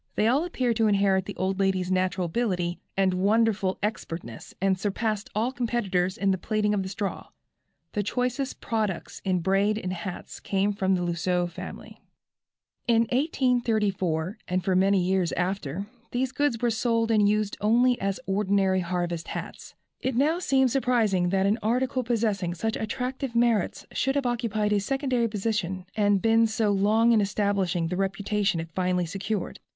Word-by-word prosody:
They 210 - +2
all 270 +7 +3
appeared 250 -9 -1
to 225 -1 +3
inherit 195 -2 +2
the 205 - -6
old 190 +1 -1
lady's 190 -2 +1
natural 185 0 +1
ability 175 -2 -1 0.2
and 190 -1 +3
wonderful 200 0 +2
expertness, 165 - -5
and 195 0 +2
surpassed 210 +2 -2
all 225 +4 +1
competitors 205 -7 -1
in 195 -1 +2
the 190 - 0
plaiting 210 +1 0
of 205 - +1
the 190 - -4
straw. 195 +1 -4 0.7
The 210 - 0
choicest 250 +5 -2
products 215 -6 -2
in 185 -2 0
braid 195 +4 +2
and 185 -4 -3
hats 180 +1 -7
came 200 +1 0
from 190 -1 +1
the 180 - -1
Lousseux 175 +1 0
family. - - -9 0.9
In 230 -1 +4
1834, 220 - 0
and 180 0 -1
for 190 - +2
many 195 +2 +4
years 185 -1 +1
after, 180 -1 -2 0.2
these 255 +1 -1
goods 265 -3 0
were 240 - +3
sold 230 0 +1
and 210 -2 +4
used 210 -1 0
only 240 +4 +3
as 195 0 -1
ordinary 195 -1 +2
harvest 175 -2 -2
hats. - - -7 0.2
It 260 -2 -2
now 305 +7 +2
seems 265 -7 +2
surprising 225 -9 +2
that 190 +1 +2
an 210 +4 +2
article 250 +4 0
possessing 215 -7 0
such 220 +5 -2
attractive 250 +3 -3
merits 235 -4 +1
should 270 +1 0
have 280 -2 0
occupied 225 -4 0
a 205 - +3
secondary 260 +1 0
position 200 -4 -2
and 205 -2 +2
been 225 0 +4
so 220 -1 +1
long 215 +4 +3
in 225 -2 +5
establishing 195 -4 0
the 180 - -2
reputation 195 -1 0
it 165 0 -6
finally 180 -1 0
secured. 195 +3 -4
205 Hz, 165 wpm, -26 LUFS, 185-230 Hz, 0.9 s, in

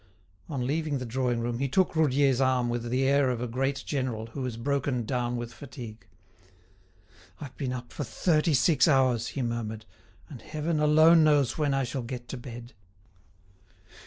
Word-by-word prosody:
On 135 -5 -2
leaving 150 +1 -1
the 125 - -5
drawing 120 0 -1
room, 120 0 -2
he 135 - 0
took 180 +6 +1
Roudier's 140 -4 +3
arm 130 -2 +2
with 120 0 -3
the 130 +2 +1
air 140 -1 +3
of 125 -2 -1
a 125 - -3
great 135 +3 -2
general 130 -6 -2
who 135 - -5
is 115 -2 -5
broken 130 -1 -1
down 125 0 -1
with 120 0 -6
fatigue. 120 -6 -10 1.3
"I've 140 -4 -9
been 135 -4 -3
up 125 -1 -7
for - - -4
thirty 155 +3 +1
six 135 +3 +4
hours," 130 -5 +3
he 135 - 0
murmured, 110 -2 -4 0.4
"and - - -10
heaven 155 +1 -2
alone 155 +2 +6
knows 145 -4 +3
when 145 -2 +1
I 135 - +1
shall 130 +1 -3
get 120 0 -7
to 135 - -5
bed!" 120 0 -9
130 Hz, 175 wpm, -28 LUFS, 120-145 Hz, 1.3 s, alone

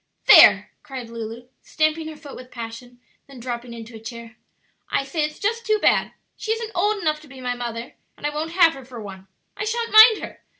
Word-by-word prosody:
"There!" - - +7
cried 260 -6 -9
Lulu, 230 +1 -7
stamping 310 0 -1
her 315 - -8
foot 295 -2 -11
with 255 0 -11
passion, 240 +1 -9 0.3
then 275 -2 -13
dropping 240 0 -6
into 230 0 -10
a - - -9
chair, 235 +1 -10 0.5
"I - - 0
say 305 +3 -2
it's 300 0 -4
just 460 +3 -2
too 430 -2 +1
bad! - - +2 0.2
She 440 - -4
isn't 450 -1 -5
old 415 +4 +1
enough 310 -4 -1
to 305 - -16
be 265 -1 -13
my 250 -1 -2
mother, 235 -1 -6 0.2
and - - -9
I 295 - 0
won't 315 +2 -4
have 335 -2 +5
her 270 - -11
for 245 -1 -11
one; 195 -2 -10 0.3
I 410 - -4
sha'n't 460 +2 -2
mind 435 0 +8
her! - - -9
270 Hz, 215 wpm, -22 LUFS, 235-335 Hz, 0.5 s, mind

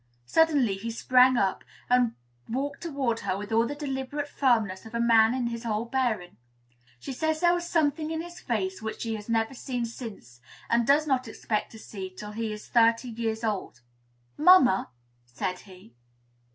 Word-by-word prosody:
Suddenly 270 - +3
he 225 +4 -5
sprang 250 +2 +4
up, 195 -3 0 0.2
and 245 -2 +3 0.3
walked 280 +4 -3
toward 275 -8 -1
her 185 - -2
with 205 +2 -7
all 230 +1 +3
the 290 - -4
deliberate 285 0 -4
firmness 225 -10 +1
of 225 0 -10
a - - 0
man 230 0 +5
in 255 -2 -1
his 235 0 -4
whole 220 -1 -1
bearing. 230 - -1 0.6
She 270 - -6
says 315 +3 -1
there 345 +1 +4
was 345 0 -2
something 310 -1 +1
in 320 0 -2
his 345 0 -10
face 190 -5 -2
which 220 0 -5
she 225 -1 -2
has 210 0 -7
never 225 +2 +1
seen 245 -2 -3
since, 215 - -9 0.3
and 235 0 +3
does 295 +2 +4
not 260 -4 0
expect 220 -1 -3
to - - -10
see 195 -3 -7
till 210 +3 -9
he 220 0 -3
is 210 0 -8
thirty 230 +1 +3
years 225 -1 -3
old. 205 - -3 0.6
"Mamma!" 300 - +6 0.4
said 180 +9 -4
he. 185 - -16
235 Hz, 180 wpm, -27 LUFS, 215-270 Hz, 0.6 s, Mamma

